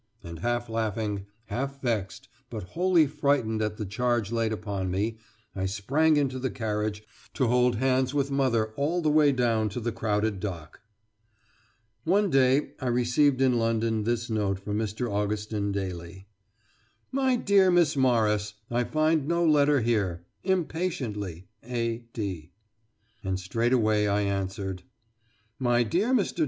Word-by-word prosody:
And 85 -1 -8
half 120 +4 -1
laughing, 110 -3 -2 0.2
half 135 +3 -4
vexed, 110 -8 -2 0.2
but - - -5
wholly 175 -2 +4
frightened 140 -6 0
at 105 -1 -2
the 105 - -3
charge 120 +1 0
laid 115 -1 0
upon 100 -3 -3
me, 105 +5 -1 0.4
I 95 0 -1
sprang 140 +11 +2
into 135 -3 0
the 130 +1 -1
carriage, 105 -3 -3 0.3
to 130 - +2
hold 125 0 +3
hands 130 +2 +1
with 140 -1 0
mother 120 -6 +1
all 165 +5 0
the 155 - +3
way 150 -1 +5
down 115 -4 +1
to 110 - -5
the 120 0 -2
crowded 110 -2 -1
dock. 85 -6 -6 1.2
One 195 +2 +2
day 135 +1 +3
I 130 - -2
received 125 +3 +2
in 125 -2 +3
London 115 -1 0
this 120 +1 -1
note 105 -4 0
from 105 +2 -3
Mr. 110 +3 -2
Augustin 105 0 -2
Daly: 95 -1 -5 0.9
"MY 265 -1 +2
DEAR 200 -5 +4
MISS 175 -5 +3
MORRIS: 105 -5 +2 0.2
I 120 +1 +1
find 155 0 +1
no 170 +1 +2
letter 145 -3 +4
here. 100 -7 0 0.2
Impatiently, 140 - -2 0.2
A. 115 -1 -2
D." 95 -8 -5 0.7
And 95 -1 -2
straightway 110 +1 +1
I 100 0 +1
answered: 95 -1 -3 0.8
"MY 120 -2 +3
DEAR 185 - 0
MR. 220 -8 +1
115 Hz, 145 wpm, -27 LUFS, 105-135 Hz, 1.2 s, way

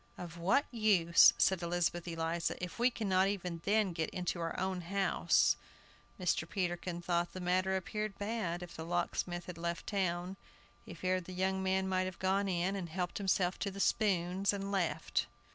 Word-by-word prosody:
"Of 170 -2 -7
what 190 +11 +3
use," 200 -8 +6
said 190 -2 +3
Elizabeth 175 0 -1
Eliza, 165 0 -1
"if 180 +4 -6
we 245 +1 +5
cannot 195 -5 +1
even 180 -4 -3
then 205 -2 +2
get 160 -2 -2
into 180 -1 -3
our 165 0 -3
own 190 -1 -1
house?" 195 +3 +2 0.6
Mr. 175 -2 0
Peterkin 175 -2 -2
thought 175 0 0
the 185 - -6
matter 185 +1 +1
appeared 210 +2 -3
bad, 205 -5 -2
if 175 - -10
the 160 - -6
locksmith 175 +1 -2
had 175 -2 -8
left 170 0 -3
town. 185 -2 -1 0.5
He - - -10
feared 185 -1 -1
the 185 - -8
young 190 +1 0
man 190 0 +1
might 185 0 +1
have 185 -1 -5
gone 195 +1 +1
in, 185 +1 0
and 180 -4 -4
helped 180 +3 -3
himself 190 -2 +1
to 195 -1 -3
spoons, 195 -1 +2
and 200 0 -4
left. 190 -4 0
185 Hz, 175 wpm, -34 LUFS, 175-195 Hz, 0.6 s, use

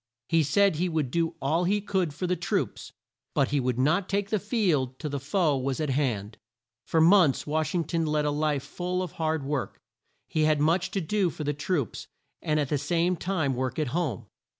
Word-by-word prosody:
He 165 -1 +4
said 160 +4 +3
he 180 +2 0
would 155 -6 -1
do 165 +1 0
all 160 +6 +1
he 205 +3 +2
could 190 -5 -1
for 165 +6 -4
the 180 0 +1
troops, 175 - -2 0.4
but 135 - +2
he 145 - +1
would 125 -2 -1
not 165 +9 +2
take 200 0 -1
the 215 - +2
field 175 - 0
till 150 -3 -5
the 140 - -2
foe 150 +2 +1
was 135 +1 -2
at 150 -3 0
hand. 115 -7 -1 0.5
For 165 - +2
months 165 -3 +5
Wash 155 +3 -1
ing 170 - +2
ton 165 +1 -1
led 150 0 +1
a 150 - +1
life 145 -2 0
full 180 +5 -3
of 180 - -6
hard 160 -2 -1
work. 140 -3 -3 0.5
He 155 -1 +1
had 155 -1 +3
much 165 +5 +2
to 195 - -2
do 190 +2 +1
for 155 - -6
the 145 0 0
troops, 145 - -2 0.3
and 155 0 +1
at 145 -3 -1
the 145 - 0
same 175 +4 +1
time 165 -6 -1
work 130 0 -2
at 155 -4 0
home. 150 - -2
155 Hz, 215 wpm, -27 LUFS, 140-180 Hz, 0.5 s, months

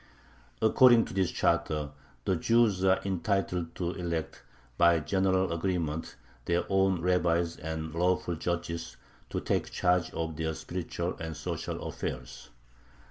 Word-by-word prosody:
According 120 +1 +6
to - - -9
this 95 -2 +1
charter, 75 -2 0 0.3
the 95 - +2
Jews 110 +1 +3
are 95 0 +4
entitled 95 -3 -1
to 85 -1 -2
elect, 85 -4 -4 0.3
by 85 +1 +5
general 95 +2 +1
agreement, 80 -4 -2 0.3
their 85 0 +1
own 95 -2 +2
rabbis 85 -2 +2
and 80 0 -5
"lawful 90 +1 +1
judges" 85 0 -3 0.3
to - - -2
take - - -1
charge 90 -2 +1
of 80 -2 -3
their 80 -1 -2
spiritual 85 +1 -4
and 80 -2 -5
social 75 - -4
affairs. - - -6
85 Hz, 130 wpm, -29 LUFS, 80-95 Hz, 0.3 s, According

